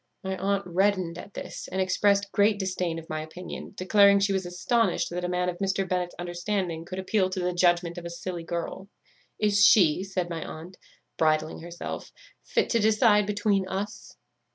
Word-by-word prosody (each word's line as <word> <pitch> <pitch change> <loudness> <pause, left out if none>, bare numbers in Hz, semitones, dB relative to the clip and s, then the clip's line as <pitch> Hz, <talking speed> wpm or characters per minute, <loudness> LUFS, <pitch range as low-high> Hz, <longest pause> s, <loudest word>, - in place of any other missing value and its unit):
My 190 0 -2
aunt 200 +1 0
reddened 185 -1 0
at 200 - -11
this, - - -7
and 190 - -4
exprest 200 +2 +2
great 205 +1 +3
disdain 185 -3 -2
of 165 0 -8
my 155 0 -3
opinion, 175 +6 -8
declaring 200 +1 +5
she 195 0 +1
was 190 -2 -1
astonished 230 +7 0
that 180 +1 -3
a 180 - -1
man 180 0 0
of 175 -1 -3
Mr. 195 -1 0
Bennet's 180 -1 -2
understanding 175 -1 -3
could 185 +2 -7
appeal 190 0 +1
to 185 - -3
the 180 0 -1
judgment 175 0 +2
of 170 - -11
a - - -4
silly 170 0 -5
girl; 170 +3 -5 0.5
'Is 205 -1 +3
she,' 185 -5 +6
said 190 -2 -2
my 165 -2 -4
aunt, 170 +4 -9 0.4
bridling 155 0 +1
herself, 170 +1 -7 0.3
'fit - - 0
to 230 - +3
decide 215 -1 +4
between 205 -2 +1
us? 200 +3 -5
185 Hz, 180 wpm, -27 LUFS, 175-200 Hz, 0.5 s, she